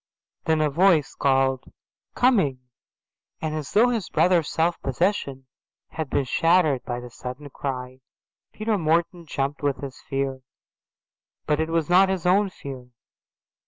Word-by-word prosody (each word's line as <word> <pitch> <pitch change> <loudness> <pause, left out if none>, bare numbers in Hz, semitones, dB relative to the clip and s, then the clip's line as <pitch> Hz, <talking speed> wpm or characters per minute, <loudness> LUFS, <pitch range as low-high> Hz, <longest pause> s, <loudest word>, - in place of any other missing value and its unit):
Then 160 -1 +2
a 150 - +2
voice 165 -2 +3
called 135 -1 +1 0.4
"Coming", 195 - +3 0.8
and 155 -1 -3
as 155 -2 -5
though 235 +4 +5
his 230 -6 -2
brother's 175 -4 +2
self 170 +1 0
possession 135 -2 -1 0.4
had 160 -4 -5
been 140 - +1
shattered 160 -2 +2
by 120 - -3
the 125 0 -10
sudden 130 +4 -8
cry, 130 -1 -5 0.5
Peter 215 -1 -1
Morton 170 +1 0
jumped 140 0 -2
with 145 -2 0
his 135 -2 -8
fear. 135 -1 -2 1.0
But 150 0 +1
it 160 0 -1
was 165 -2 0
not 185 +2 +5
his 185 -2 -2
own 195 +3 +3
fear. 135 -8 -9
155 Hz, 140 wpm, -24 LUFS, 135-180 Hz, 1.0 s, though